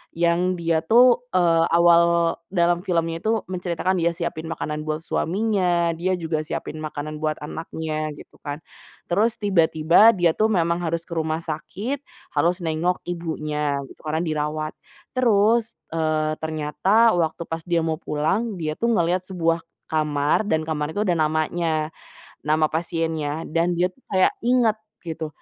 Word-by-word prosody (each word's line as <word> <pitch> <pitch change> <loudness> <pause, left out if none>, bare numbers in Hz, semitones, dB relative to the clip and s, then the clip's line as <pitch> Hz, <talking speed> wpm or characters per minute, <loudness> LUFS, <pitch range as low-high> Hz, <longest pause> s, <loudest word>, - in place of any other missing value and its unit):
yang 170 +2 +2
dia 165 -2 +1
tuh, 240 +7 +4
eee, 165 -2 +4
awal 170 0 +4
dalam 175 -2 +2
filmnya 165 -2 0
itu 220 +2 0
menceritakan 180 0 -1
dia 170 0 +1
siapin 170 -2 -4
makanan 150 -1 -4
buat 155 +1 -2
suaminya, 180 -2 +1
dia 175 +3 -1
juga 160 -3 -2
siapin 155 0 -5
makanan 155 0 -5
buat 155 0 0
anaknya, 155 -1 -4
gitu - - -15
kan. 145 +1 -6 0.5
Terus 215 +6 +3
tiba-tiba 185 0 +4
dia 175 -3 +3
tuh 215 +7 +2
memang 170 -5 +1
harus 170 -1 -2
ke 170 - -23
rumah 160 0 -1
sakit 200 - -4 0.3
harus 175 +2 +1
nengok 165 +2 -1
ibunya 155 -4 -2 0.2
gitu - - -16
karena 160 +2 0
dirawat. 155 -1 -2 0.4
Terus, 230 -1 +2 0.2
eee, 155 -1 0
ternyata 160 +9 +2
waktu 170 -2 0
pas 165 0 -4
dia 170 -2 +1
mau 160 -1 -1
pulang 195 +9 -1
dia 160 -4 -3
tuh 235 - +1
ngeliat 180 -2 +1
sebuah 165 -3 0 0.3
kamar 150 +2 +1
dan 160 -6 -1
kamar 150 -1 -2
itu 205 - -4
ada 175 - +2
namanya, 155 0 0 0.5
nama 155 +1 +2
pasiennya, 160 -2 -2
dan 170 +2 +1
dia 180 +2 +1
tuh 265 - -30
kayak 185 -1 +3
inget 240 -2 +3 0.3
gitu, 160 -1 -4
165 Hz, 150 wpm, -23 LUFS, 155-180 Hz, 0.5 s, tuh